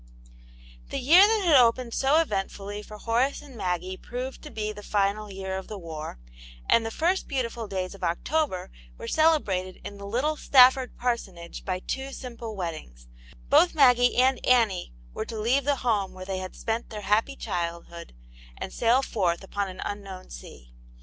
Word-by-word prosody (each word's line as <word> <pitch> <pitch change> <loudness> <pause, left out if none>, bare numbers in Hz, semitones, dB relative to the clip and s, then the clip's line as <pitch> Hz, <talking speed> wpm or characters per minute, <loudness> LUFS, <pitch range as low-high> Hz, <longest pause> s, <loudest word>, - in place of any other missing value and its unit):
THE - - -3
year 345 +10 +7
that 435 -2 +1
had 325 -4 +5
opened 240 -1 +4
so 300 +5 +3
cvcntfully 205 -1 -4
for 210 0 -10
Horace 240 +7 0
and 275 -3 -13
Maggie 185 -2 -2
proved 255 +5 -6
to 300 - -9
be 215 -4 -3
the 210 - -10
final' 205 0 0
year 190 0 -4
of 190 - -11
the 210 - -6
war; 160 - -7 0.5
and 230 - +4
the 225 - -3
first 345 +10 0
beautiful 235 -4 -3
days 185 -1 -3
of 195 - -12
October 185 - -1 0.3
were - - -8
celebrated 205 - +1
in 200 0 -8
the 200 - -7
little 275 +9 0
Stafford 260 -2 +5
par 245 -1 +1
sonage 170 -6 -10
by 185 -2 -1
two 270 +5 -4
simple 235 -3 -7
weddings; 155 - -6 0.4
both 320 +5 +5
Maggie 245 -4 +5
and 255 +1 +3
Annie 225 - +2 0.2
were - - -4
to 225 - -6
leave 250 +5 +1
the 285 0 +2
home 205 -5 +1
where 185 0 -9
they 190 0 -3
had 185 0 -7
spent 225 +1 -3
their 215 -2 -6
happy 215 +7 +1
childhood, 170 - -5 0.4
and - - -6
sail 245 +3 +3
forth 180 -8 -1
upon 200 0 -3
an 185 0 -8
un 205 0 -4
known 190 -2 -10
sea. - - -12
215 Hz, 180 wpm, -26 LUFS, 190-260 Hz, 0.5 s, year